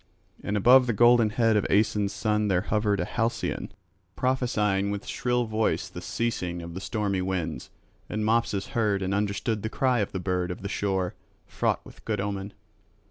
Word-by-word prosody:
And 105 0 -1
above 125 +5 +6
the 120 - +1
golden 120 +1 +5
head 115 0 +2
of 105 - +2
Aeson's 105 -1 +2
son 105 +1 0
there 90 -3 +2
hovered 105 0 0
a - - 0
halcyon 115 0 -2 0.4
prophesying 105 -6 +1
with 100 0 -4
shrill 125 -1 0
voice 110 0 0
the - - -8
ceasing 90 -7 -2
of 85 0 -8
the 95 - -6
stormy 100 -2 -1
winds; 90 -4 -3 0.4
and 110 0 -2
Mopsus 110 -3 +1
heard 105 -4 +1
and 95 +1 -1
understood 105 +2 -1
the 110 - -3
cry 130 -1 +1
of 100 - -1
the 95 - -3
bird 90 -1 -1
of 90 - -6
the - - -2
shore, 95 -3 -1 0.3
fraught - - -1
with - - -15
good 105 -2 -2
omen. 100 0 -3
105 Hz, 180 wpm, -27 LUFS, 95-115 Hz, 0.4 s, above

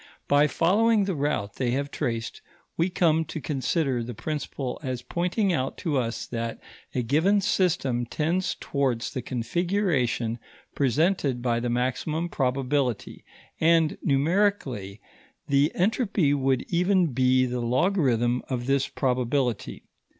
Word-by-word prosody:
By 145 +1 +4
following 210 +8 +3
the 195 -1 -1
route 140 -9 -2
they 130 -2 0
have 140 0 -3
traced, 115 -6 -3 0.3
we 170 +3 +1
come 165 -3 +2
to 160 +1 -6
consider 135 -2 -1
the 120 0 -6
principle 140 -2 -4
as 130 -4 -4
pointing 180 - 0
out 135 -4 -2
to 160 -6 -2
us 115 -1 -3
that 115 -1 -4 0.4
a 125 - +1
given 160 - +3
system 165 - 0
tends 170 +8 -1
towards 130 -5 -1
the 130 - -3
configuration 125 - -1 0.3
presented 140 - +1
by 120 -2 +1
the 120 0 -2
maximum 130 +7 -1
probability, 130 - -1 0.4
and, 165 -1 +3
numerically, 140 - 0 0.5
the 140 +2 +3
entropy 195 - +1
would 135 -2 +1
even 180 -3 +2
be 130 0 +3
the 125 -1 -2
logarithm 125 - +1
of 125 -2 -2
this 135 0 +1
probability. 125 -2 -1
140 Hz, 130 wpm, -26 LUFS, 125-170 Hz, 0.5 s, By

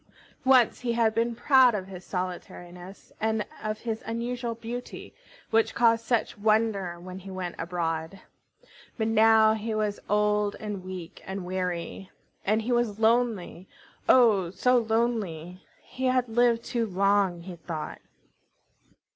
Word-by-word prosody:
Once 255 -3 +5
he 245 -1 -1
had 230 -2 +2
been 230 +1 0
proud 260 -2 +5
of 190 -3 -3
his 185 -2 -10
solitariness 180 0 -7
and 220 -1 0 0.2
of 215 0 -4
his 225 -2 -3
unusual 235 +1 -3
beauty, 235 +2 -7 0.4
which 225 0 +2
caused 230 -1 +3
such 230 -3 -1
wonder 210 -5 +1
when 185 +1 -8
he 195 +1 -11
went 185 -2 -4
abroad. 165 +1 -3 0.8
But 220 -1 0
now 220 0 +5
he 220 0 -3
was 210 -1 -1
old 210 0 +2
and 210 -3 -5
weak 185 -3 -8
and 190 -1 -5
weary, 180 0 -4 0.3
and 215 +2 +1
he 245 - -2
was 240 -4 +1
lonely, 220 -5 +1 0.4
oh! 215 -8 +5
so 250 +7 +3
lonely! 215 -7 -2 0.2
He 260 - -5
had 255 -1 +2
lived 235 0 +2
too 235 -2 -1
long, 195 -2 +2
he 180 +1 -8
thought. 160 -2 -6
215 Hz, 140 wpm, -27 LUFS, 185-230 Hz, 0.8 s, Once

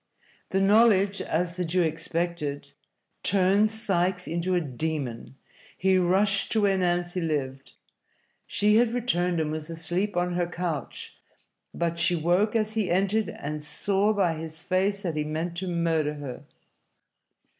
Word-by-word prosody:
The 190 - +1
knowledge, 200 -1 +4
as 170 +2 -2
the 180 - 0
Jew 175 +1 +1
expected, 165 -2 -3 0.5
turned 195 +3 +3
Sikes 185 -4 0
into 170 +2 -1
a - - +3
demon. 140 -4 -4 0.4
He 190 0 +3
rushed 195 +2 +2
to 220 - +2
where 200 -1 +3
Nancy 175 0 0
lived. 135 -4 -3 0.7
She 210 +1 +3
had 235 0 +2
returned 180 -8 0
and 155 -1 -1
was 155 0 -5
asleep 175 +4 -2
on 175 0 0
her 175 0 0
couch, 170 -6 -5 0.6
but 170 0 -2
she 175 - +3
woke 180 +7 +1
as 215 -1 +1
he 215 -4 0
entered, 195 +3 +1
and 150 +1 -6
saw 195 +7 +1
by 195 -6 +1
his 160 0 -6
face 190 +3 0
that 170 -4 -2
he 150 - +1
meant 160 +3 -3
to 190 +2 -3
murder 165 -3 0
her. 140 -4 -8
175 Hz, 145 wpm, -26 LUFS, 160-195 Hz, 0.7 s, knowledge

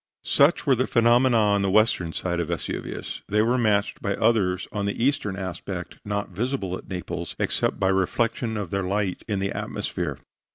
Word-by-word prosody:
Such 145 +4 +4
were 140 - +5
the 130 +1 +1
phenomena 120 +1 +4
on 105 -2 +3
the 100 - +1
western 95 -5 +3
side 85 +1 -2
of 85 - -1
Vesuvius. 85 -1 -4
They 105 +1 +3
were 125 +3 +2
matched 105 -3 +1
by 100 -1 -1
others 100 -5 +2
on 105 -1 -2
the 100 - -1
eastern 130 -8 +1
aspect, 95 -3 -6
not 100 0 -2
visible 100 -1 -2
at - - -10
Naples, 90 -2 -5
except - - 0
by 95 - +2
reflection 110 +4 0
of 100 -5 -4
their 100 - 0
light 95 0 -1
in 105 -3 -1
the 100 +1 -1
atmosphere. - - -3
100 Hz, 180 wpm, -25 LUFS, 95-115 Hz, -, were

